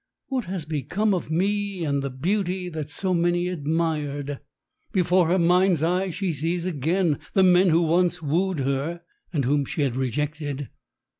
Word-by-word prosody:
"What 260 Hz, -3 st, -1 dB
has 180 Hz, -3 st, -4 dB
become 170 Hz, -, 0 dB
of 180 Hz, -4 st, -2 dB
me 195 Hz, +1 st, 0 dB
and 140 Hz, -2 st, 0 dB
the 140 Hz, -, -2 dB
beauty 180 Hz, +6 st, -1 dB
that 155 Hz, -3 st, -5 dB
so 185 Hz, +5 st, -1 dB
many 175 Hz, +1 st, +1 dB
admired?" 150 Hz, -4 st, -2 dB, 0.5 s
Before 180 Hz, -3 st, +3 dB
her 180 Hz, +3 st, +3 dB
mind's 180 Hz, -1 st, +3 dB
eye 180 Hz, +3 st, +1 dB
she 180 Hz, 0 st, -2 dB
sees 165 Hz, +4 st, -2 dB
again 165 Hz, 0 st, 0 dB, 0.2 s
the 190 Hz, -, +5 dB
men 180 Hz, 0 st, +5 dB
who 165 Hz, +1 st, +4 dB
once 175 Hz, +2 st, +2 dB
wooed 165 Hz, +2 st, 0 dB
her 140 Hz, +6 st, -2 dB, 0.3 s
and 145 Hz, -7 st, 0 dB
whom 145 Hz, +2 st, +2 dB
she 155 Hz, +2 st, -2 dB
had 130 Hz, -4 st, 0 dB
rejected. 145 Hz, +2 st, -2 dB
170 Hz, 160 wpm, -24 LUFS, 145-185 Hz, 0.5 s, the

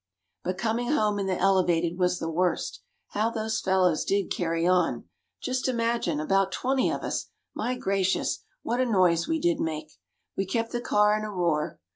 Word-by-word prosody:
"But 185 Hz, 0 st, -2 dB
coming 235 Hz, +6 st, 0 dB
home 210 Hz, -7 st, +2 dB
in 195 Hz, -, -1 dB
the 185 Hz, -1 st, 0 dB
Elevated 175 Hz, -3 st, +2 dB
was 180 Hz, 0 st, +2 dB
the 165 Hz, -, -4 dB
worst. 175 Hz, +2 st, -1 dB, 0.3 s
How 215 Hz, +2 st, 0 dB
those 220 Hz, -1 st, -2 dB
fellows 185 Hz, -4 st, +2 dB
did 200 Hz, -1 st, 0 dB
carry 165 Hz, -1 st, 0 dB
on! 180 Hz, -2 st, +2 dB, 0.4 s
Just 255 Hz, 0 st, -1 dB
imagine 230 Hz, -, 0 dB
about 195 Hz, +4 st, +2 dB
twenty 260 Hz, +4 st, +1 dB
of -, -, -3 dB
us -, -, -2 dB, 0.3 s
my 250 Hz, -, -2 dB
gracious! 195 Hz, -4 st, 0 dB, 0.2 s
what 240 Hz, +2 st, 0 dB
a -, -, +3 dB
noise 180 Hz, -6 st, +3 dB
we 320 Hz, -, 0 dB
did 345 Hz, -1 st, +1 dB
make! 155 Hz, -1 st, -4 dB, 0.4 s
We 195 Hz, -, -1 dB
kept 230 Hz, +3 st, -1 dB
the 240 Hz, -, -2 dB
car 210 Hz, -2 st, +3 dB
in 215 Hz, -, -2 dB
a 215 Hz, -, -4 dB
roar. 170 Hz, -6 st, -1 dB
195 Hz, 180 wpm, -27 LUFS, 175-230 Hz, 0.4 s, a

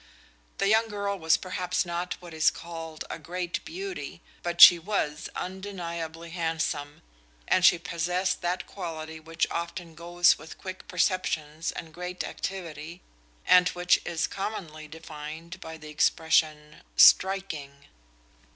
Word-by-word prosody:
The 195 Hz, -, +1 dB
young 220 Hz, +2 st, +4 dB
girl 200 Hz, -2 st, -3 dB
was 160 Hz, -1 st, +4 dB
perhaps 185 Hz, 0 st, -2 dB
not 175 Hz, +1 st, -3 dB
what 175 Hz, -2 st, -11 dB
is 160 Hz, -1 st, +4 dB
called 165 Hz, -1 st, -8 dB
a -, -, -5 dB
great 175 Hz, 0 st, -4 dB
beauty, 380 Hz, +3 st, -6 dB, 0.2 s
but 170 Hz, 0 st, -4 dB
she 175 Hz, -, +11 dB
was 165 Hz, -5 st, -2 dB
undeniably 170 Hz, -4 st, -5 dB
handsome, 160 Hz, -4 st, -2 dB, 0.4 s
and 185 Hz, -, +3 dB
she 180 Hz, -, +7 dB
possessed 175 Hz, +3 st, -1 dB
that 175 Hz, +1 st, -1 dB
quality 160 Hz, -4 st, -6 dB
which 165 Hz, +1 st, -1 dB
often 170 Hz, 0 st, -4 dB
goes 175 Hz, +2 st, +3 dB
with 155 Hz, +2 st, -11 dB
quick 185 Hz, 0 st, -8 dB
perceptions 160 Hz, -4 st, -1 dB
and 160 Hz, -1 st, -8 dB
great 180 Hz, +1 st, -5 dB
activity, 170 Hz, -2 st, -6 dB, 0.4 s
and 180 Hz, -1 st, +6 dB
which 180 Hz, 0 st, +3 dB
is 170 Hz, -2 st, -1 dB
commonly 165 Hz, -6 st, -5 dB
defined 160 Hz, +2 st, -9 dB
by 160 Hz, 0 st, -8 dB
the 155 Hz, -1 st, -11 dB
expression 150 Hz, 0 st, +1 dB, 0.2 s
"striking." 155 Hz, -8 st, +4 dB
170 Hz, 130 wpm, -27 LUFS, 160-185 Hz, 0.4 s, she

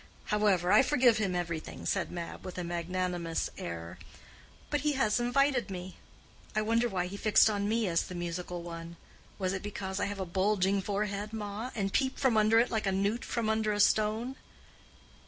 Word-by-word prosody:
However, 195 Hz, -4 st, +3 dB
I 210 Hz, -, +8 dB
forgive 250 Hz, -5 st, +4 dB
him 195 Hz, -4 st, 0 dB
everything," 170 Hz, -2 st, -4 dB
said -, -, 0 dB
Mab, 170 Hz, -1 st, -6 dB
with 185 Hz, -1 st, -7 dB
a 180 Hz, -, -2 dB
magnanimous 175 Hz, 0 st, -2 dB
air, 85 Hz, 0 st, -6 dB, 0.7 s
"but 295 Hz, -, +2 dB
he 300 Hz, 0 st, +1 dB
has 245 Hz, -5 st, +2 dB
invited 250 Hz, -1 st, +2 dB
me. 185 Hz, -1 st, -7 dB, 0.6 s
I 215 Hz, -, +2 dB
wonder 230 Hz, +2 st, +2 dB
why 185 Hz, -3 st, -1 dB
he 185 Hz, +2 st, -6 dB
fixed 215 Hz, +1 st, +5 dB
on 205 Hz, 0 st, -1 dB
me 225 Hz, -1 st, +1 dB
as 165 Hz, -2 st, +2 dB
the 180 Hz, -, -7 dB
musical 175 Hz, 0 st, -4 dB
one? 170 Hz, 0 st, -7 dB, 0.4 s
Was 185 Hz, -1 st, -1 dB
it 190 Hz, -, -3 dB
because 195 Hz, -2 st, -4 dB
I -, -, +1 dB
have 200 Hz, 0 st, -5 dB
a 190 Hz, -, -2 dB
bulging 195 Hz, +2 st, +1 dB
forehead, 205 Hz, +1 st, -2 dB
ma, 215 Hz, +2 st, -4 dB
and 195 Hz, -3 st, -1 dB
peep 265 Hz, -1 st, +1 dB
from 260 Hz, -5 st, +2 dB
under 215 Hz, +1 st, +5 dB
it 235 Hz, +2 st, +3 dB
like 220 Hz, -3 st, 0 dB
a -, -, +2 dB
newt 200 Hz, +5 st, 0 dB
from 230 Hz, -2 st, -2 dB
under 220 Hz, -1 st, +1 dB
a 205 Hz, -, -2 dB
stone?" 220 Hz, +5 st, +2 dB
200 Hz, 190 wpm, -31 LUFS, 180-220 Hz, 0.7 s, I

